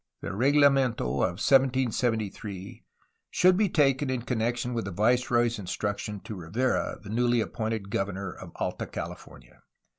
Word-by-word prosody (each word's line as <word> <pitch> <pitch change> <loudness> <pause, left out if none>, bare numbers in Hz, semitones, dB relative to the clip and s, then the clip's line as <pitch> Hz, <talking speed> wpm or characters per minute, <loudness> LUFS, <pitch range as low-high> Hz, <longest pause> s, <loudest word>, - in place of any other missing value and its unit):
The - - -4
reglamento 135 +1 +3
of 90 +8 0
1773 115 -6 0 0.5
should 185 0 +4
be 205 +1 +2
taken 140 -3 +2
in 130 -2 -2
connection 120 0 -1
with 115 -3 -2
the 100 - -4
viceroy's 120 +3 +2
instructions 100 +2 -3
to - - -7
Rivera, 105 +8 -1
the 100 - -10
newly 120 +2 +2
appointed 110 -2 -3
governor 95 0 -2
of - - -11
Alta - - -3
California. - - -9
115 Hz, 130 wpm, -27 LUFS, 100-130 Hz, 0.5 s, should